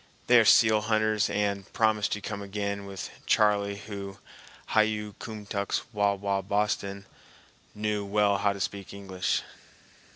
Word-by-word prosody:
They 125 -1 +7
are 115 - +4
seal 110 0 +6
hunters 110 -1 +1
and 100 -2 -1
promised 110 -2 +2
to 105 - -4
come 105 0 -5
again 100 0 -4
with 95 -1 -6 0.2
"Charley," 100 -1 +3
who 100 -2 -7 0.5
"hi 110 - +3
yu 105 -1 -1
kumtux 105 -2 -3
wawa 100 -1 +1
Boston"—knew 105 +1 -4
well 100 0 +2
how 100 - +2
to 100 - -6
speak 100 0 -4
English. 95 -1 -2
100 Hz, 130 wpm, -28 LUFS, 100-105 Hz, 0.5 s, They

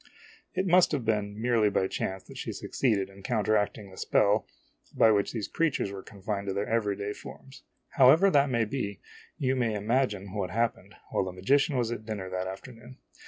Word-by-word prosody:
It 190 - 0
must 180 0 +4
have 130 -5 -1
been 105 -1 -1
merely 115 -2 +3
by 95 - +1
chance 95 0 -3
that - - -11
she - - -4
succeeded 105 -7 0
in 100 0 -15
counteracting 105 -2 0
the 95 - -14
spell 105 +1 +2 0.5
by 110 - +6
which 100 -1 +1
these 110 -5 -3
creatures 160 -11 0
were 100 -1 -7
confined 100 0 -5
to 95 - -1
their 100 +1 -1
every 105 -3 0
day 100 +1 -4
forms. 135 +3 -12 0.4
However 155 +9 +7
that 140 -2 +4
may 120 -3 +1
be, 100 -6 -4 0.4
you 130 -1 0
may 115 -4 0
imagine 105 -3 0
what 100 -4 -2
happened 115 +5 -2 0.2
while 95 - +1
the 95 - -4
magician 135 - +2
was 120 -2 0
at 115 -2 -4
dinner 100 -4 -5
that 95 0 -2
afternoon. 120 +5 -10
110 Hz, 190 wpm, -28 LUFS, 100-125 Hz, 0.5 s, However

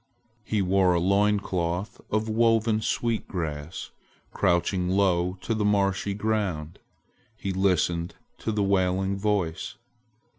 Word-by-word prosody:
He 105 -2 0
wore 95 -1 +3
a - - +2
loin 100 +3 +3
cloth 90 0 -3
of 110 +1 0
woven 115 0 +2
sweet 115 +1 -1
grass. 80 -4 -5 0.4
Crouching 90 +1 +1
low 90 -1 +2
to 115 - -1
the 110 -1 0
marshy 100 -1 +1
ground, 100 -7 -2 0.6
he 100 -3 -3
listened 90 -3 +1 0.2
to 110 - -2
the 105 -1 0
wailing 95 0 +1
voice. 95 -5 -1
95 Hz, 120 wpm, -26 LUFS, 90-105 Hz, 0.6 s, wore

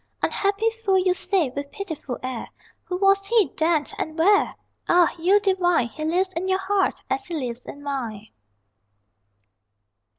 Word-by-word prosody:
Unhappy 405 +2 +1
fool, 445 -4 +1
you 365 -1 +3
say, 365 -6 0
with 280 +2 -6
pitiful 320 -10 -5
air: 255 -2 -4 0.4
Who 360 - -3
was 390 +1 +3
he, 440 - +3
then, 320 -1 +2 0.2
and 315 +1 -4
where? 400 +5 +3 0.3
Ah, 350 -1 +5
you 380 +5 +4
divine 360 - +2
He 310 +7 -7
lives 365 +4 0
in 365 +2 -2
your 375 0 +2
heart, 390 0 0
as 400 0 -2
he 345 - -4
lives 245 -4 -4
in 285 - -9
mine. 230 -7 -4
360 Hz, 155 wpm, -24 LUFS, 285-390 Hz, 0.4 s, Ah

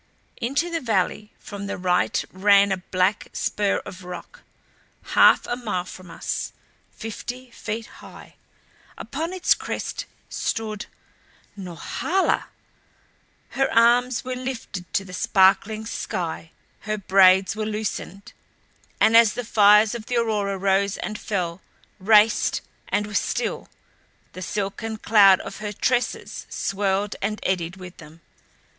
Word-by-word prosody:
Into 285 +9 -1
the 330 -1 -2
valley 210 -2 -1
from 200 -1 -8
the - - -4
right 180 -1 +1
ran 200 +1 +4
a 190 - +1
black 185 +2 0
spur 205 -1 0
of 185 -2 -9
rock, 180 -1 -9 0.7
half - - +6
a - - -2
mile 215 -7 -3
from 180 0 -11
us, - - -4 0.4
fifty 245 +3 -7
feet 225 0 -5
high. - - -14 0.6
Upon 320 +5 -4
its 370 -1 +3
crest - - -5 0.2
stood 215 -2 -3 0.7
Norhala! 200 - -1 1.0
Her 270 0 0
arms 240 +2 +4
were 255 - -3
lifted 250 -8 -6
to 195 - +1
the 180 - -11
sparkling 195 +4 +3
sky; 170 -7 -4 0.3
her 215 0 -3
braids 190 -1 +5
were 215 0 -3
loosened 210 -2 -5 0.7
and 225 - +5
as 230 -2 +7
the 245 - -4
fires 210 0 +5
of 230 -2 -7
the 245 - -1
aurora 210 -4 0
rose 195 +1 +1
and 215 0 -5
fell, 180 -4 -3 0.4
raced 210 +2 +4 0.3
and 210 - 0
were 210 - -9
still, - - -2 0.6
the 185 - -8
silken 210 +4 -3
cloud 200 -4 +6
of - - -8
her 210 -1 -5
tresses 245 +4 -1
swirled 195 0 -1
and 210 +2 -2
eddied 175 -2 -1
with 180 -1 -11
them. 160 +1 -14
205 Hz, 130 wpm, -23 LUFS, 190-225 Hz, 1.0 s, as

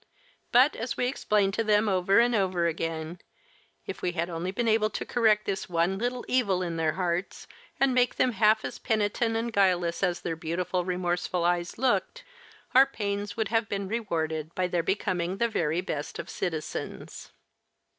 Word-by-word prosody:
But, 255 +5 +5
as 230 +1 -4
we 250 - +1
explained 210 -6 +1
to 225 - 0
them 210 0 +3
over 190 0 +2
and 240 +1 +3
over 185 -5 +1
again, 165 0 -3 0.7
if - - -6
we 180 - -1
had 170 0 -2
only 170 +2 -3
been 230 +5 -1
able 215 -1 +3
to - - -4
correct 220 -3 +2
this 195 -2 -3
one 175 +3 +1
little 245 +2 -2
evil 200 -8 +1
in 170 -2 -3
their 160 -1 0
hearts 180 +1 -2 0.3
and 270 -1 +3
make 250 0 +2
them 255 - +2
half 220 -1 +3
as - - -6
penitent 220 +1 0
and 230 0 -3
guileless 180 -4 +2
as 180 -3 0
their 165 - -3
beautiful, 175 +2 -2
remorseful 180 -1 -1
eyes 175 0 0
looked, 265 - 0 0.5
our 265 +2 +7
pains 205 -4 -4
would 220 -3 -1
have 225 -1 0
been 200 -1 -2
rewarded 160 -7 -2
by 185 - +1
their 175 -1 0
becoming 185 0 -1
the 235 - +2
very 165 -6 0
best 150 -5 -5
of - - -6
citizens. 160 -4 -5
195 Hz, 175 wpm, -27 LUFS, 175-225 Hz, 0.7 s, our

